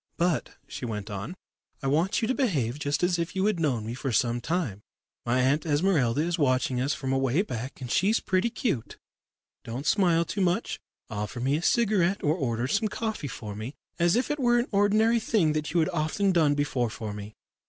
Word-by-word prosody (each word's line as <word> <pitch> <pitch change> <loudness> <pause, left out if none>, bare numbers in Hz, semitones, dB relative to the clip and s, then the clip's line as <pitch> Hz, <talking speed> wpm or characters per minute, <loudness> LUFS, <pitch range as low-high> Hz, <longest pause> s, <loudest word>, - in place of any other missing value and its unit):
"But," 170 -1 0
she - - -8
went 105 -3 -4
on, 100 - -5 0.5
"I - - -3
want 160 - +1
you - - +2
to 260 - +1
behave 150 - 0
just 145 +3 -1
as 175 -1 +2
if 170 +3 -3
you 190 +1 +1
had 210 -5 +1
known 130 -9 0
me 115 - -4
for 125 +2 -3
some 120 +1 +1
time. 155 - -2 0.5
My 125 +2 +2
Aunt 140 +4 +2
Esmeralda 150 -5 +2
is 170 +1 -1
watching 130 -2 +1
us 140 +3 0
from 135 -1 -2
away 135 +6 +2
back, 125 - -6
and 125 -2 -5
she's 210 +4 +3
pretty 185 +5 +1
'cute. 220 - -2 0.7
Don't 125 +5 -5
smile 170 -4 +3
too 200 - -3
much. 185 +5 0 0.3
Offer 105 +3 -4
me 135 +3 +2
a 155 - -1
cigarette 200 -3 +2
or 150 - +3
order 125 -7 -1
some 215 - +1
coffee 220 -8 -3
for 105 -5 -7
me, 110 +7 -6 0.2
as 170 0 +4
if 255 +5 +1
it 295 - -2
were 240 -2 +3
an 240 +2 +1
ordinary 215 +3 +3
thing 195 -9 +2
that 155 0 -2
you 170 - +2
had 160 - +1
often 175 +4 0
done 155 -5 +3
before 140 -5 0
for 110 -1 -6
me. 105 +1 -8
155 Hz, 205 wpm, -27 LUFS, 125-190 Hz, 0.7 s, as